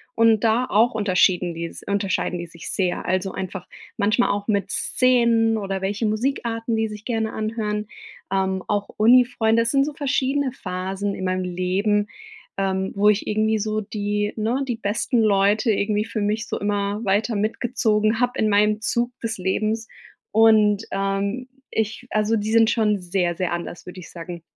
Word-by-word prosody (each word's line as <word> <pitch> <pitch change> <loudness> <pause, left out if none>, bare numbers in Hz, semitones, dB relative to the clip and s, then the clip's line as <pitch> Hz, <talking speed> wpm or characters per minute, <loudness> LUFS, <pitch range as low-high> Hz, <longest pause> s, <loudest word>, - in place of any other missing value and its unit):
Und, 225 -1 +4
da 230 +3 +3
auch 225 +3 +3
unterschieden 180 -3 +2
die 170 +1 -4
s - - -9
unterscheiden 200 -3 -1
die 175 - -5
sich 170 0 -10
sehr. 180 -2 -1
Also, 185 +1 0
einfach 190 -1 -6 0.3
manchmal 215 +4 +2
auch 205 0 -3
mit 200 -2 0
Szenen 235 -2 +2
oder 195 -2 -3
welche 205 +4 -1
Musikarten, 230 0 -1
die 220 0 0
sich 210 0 -9
gerne 225 -2 -1
anhören. 215 -1 -3 0.4
Ähm, 190 -1 0
auch 205 -1 -1
Uni-Freunde. 230 0 +4
Das 230 - 0
sind 275 0 +3
so 300 - -4
verschiedene 280 -1 0
Phasen 190 -1 -4
in 190 - -6
meinem 185 0 -1
Leben, 195 +4 0 0.5
ähm, 190 0 -1
wo 205 +1 +3
ich 210 0 +1
irgendwie 215 +1 +1
so 215 +1 -1
die 205 0 -2
ne, 235 +5 -1
die 240 - -1
besten 225 +2 0
Leute 210 +2 +3
irgendwie 210 +1 0
für 220 - -4
mich 215 +2 -1
so - - -3
immer 205 0 -1
weiter 210 +4 +1
mitgezogen 215 0 0
habe 245 0 0
in 215 - +2
meinem 210 +1 +3
Zug 240 +2 -1
des 225 -2 -3
Lebens 215 +4 -1 0.4
und, 215 -1 +4
ähm, 195 +5 -2 0.2
ich, 220 +3 -2
also 215 +1 +1
die 215 0 -2
sind 225 0 +5
schon 210 -3 +2
sehr, 180 -1 -1
sehr 180 -1 -2
anders, 175 0 -6
würde 185 +1 -9
ich 175 - -11
sagen. 170 0 -8
210 Hz, 170 wpm, -23 LUFS, 195-225 Hz, 0.5 s, sind